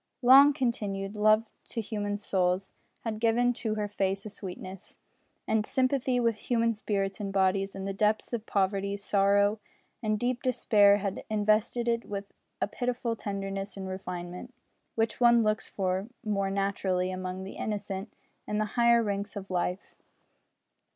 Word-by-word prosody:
Long 270 +4 +9
continued 210 -7 -2
love 215 +1 +4 0.2
to 235 - -5
human 205 -2 -2
souls 190 -2 0 0.3
had 220 -2 -4
given 235 +2 +3
to 225 -3 -2
her 210 -1 -1
face 195 0 -1
a - - -5
sweetness 190 -1 -9 0.5
and 220 -1 +2
sympathy 255 +1 +1
with 230 -2 +1
human 230 +1 +1
spirits 200 -2 -2
and 200 -2 -3
bodies 195 0 +1
in 195 0 -5
the 195 - -2
depths 215 +4 0
of 225 -1 -3
poverty, 200 0 0
sorrow, 200 +1 +2 0.4
and 215 -2 0
deep 245 +1 -1
despair 210 -5 +4
had 195 -1 -3
invested 215 +3 +1
it 230 0 0
with 200 -1 -6 0.3
a - - +1
pitiful 245 +1 -2
tenderness 195 -1 -4
and 190 -1 -5
refinement 180 +4 -6 0.4
which 225 +2 -1
one 235 -1 +6
looks 215 0 0
for 190 +1 -2 0.2
more 200 -2 0
naturally 195 -2 0
among 185 0 -4
the 190 - -7
innocent 200 -1 -4 0.4
in 210 - -1
the 215 - +1
higher 235 -1 +4
ranks 200 0 -3
of 195 -1 -7
life. 180 +1 -2
205 Hz, 150 wpm, -29 LUFS, 195-230 Hz, 0.5 s, Long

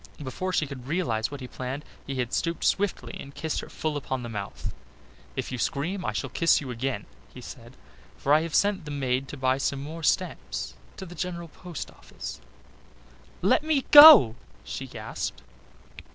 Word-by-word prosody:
Before 185 +8 -3
she 160 - +1
could 135 -3 -9
realise 135 -9 0
what 145 -1 -8
he 125 - -6
planned, 130 +4 -6 0.2
he 135 - -3
had 125 -2 -2
stooped 170 0 -1
swiftly 200 -1 0
and 140 0 -10
kissed 160 -1 -2
her - - -8
full 155 -1 -3
upon 130 -3 -3
the 120 - -5
mouth. 100 -3 -5 0.6
"If - - -4
you 125 - -4
scream, 175 +11 -2
I - - -1
shall - - -4
kiss 165 - +3
you 135 -4 -6
again," 130 +3 -3 0.3
he - - -11
said, - - -11 0.4
"for 140 - +2
I 155 - +6
have 165 -1 -3
sent 200 -4 +2
the - - -7
maid 135 -2 -1
to 145 - -8
buy 130 0 +1
some 140 0 -1
more 160 +3 -7
stamps - - -1 0.2
to 190 - -7
the 175 - -10
General 170 -1 -5
Post 175 -1 -8
Office." - - -9 1.0
"Let 195 - +4
me 310 -4 +1
go," 290 - +11 0.3
she - - -6
gasped. - - -5
145 Hz, 180 wpm, -27 LUFS, 130-175 Hz, 1.0 s, go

